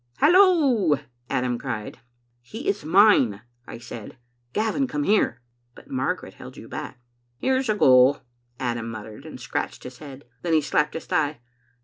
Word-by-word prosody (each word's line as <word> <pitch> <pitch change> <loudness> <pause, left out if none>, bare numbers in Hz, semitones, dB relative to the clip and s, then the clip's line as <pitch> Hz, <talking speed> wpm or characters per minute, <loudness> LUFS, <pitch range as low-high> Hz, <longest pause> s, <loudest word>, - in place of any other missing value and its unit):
"'Hallo!* 295 - +5 0.3
Adam 125 -2 -1
cried. 115 -6 -5 0.4
"'He 220 - -8
is 200 - 0
mine,' 155 - +4 0.2
I - - -8
said. 115 0 -10 0.3
'Gavin, 220 - 0
come 150 -10 -2
here.' 145 - +1 0.3
But - - -16
Margaret 130 -1 -2
held - - -12
you - - -10
back. - - -7 0.4
"'Here's 260 - 0
a 215 - +2
go,* 130 -5 +5 0.4
Adam 120 -2 -2
muttered, 110 +5 -9
and 155 - -9
scratched 125 - -4
his 125 -1 -10
head. 140 -2 -11 0.2
Then 170 -2 -1
he 155 - +4
slapped 150 +1 0
his 165 - -5
thigh. 155 -6 0
145 Hz, 150 wpm, -24 LUFS, 125-210 Hz, 0.4 s, Hallo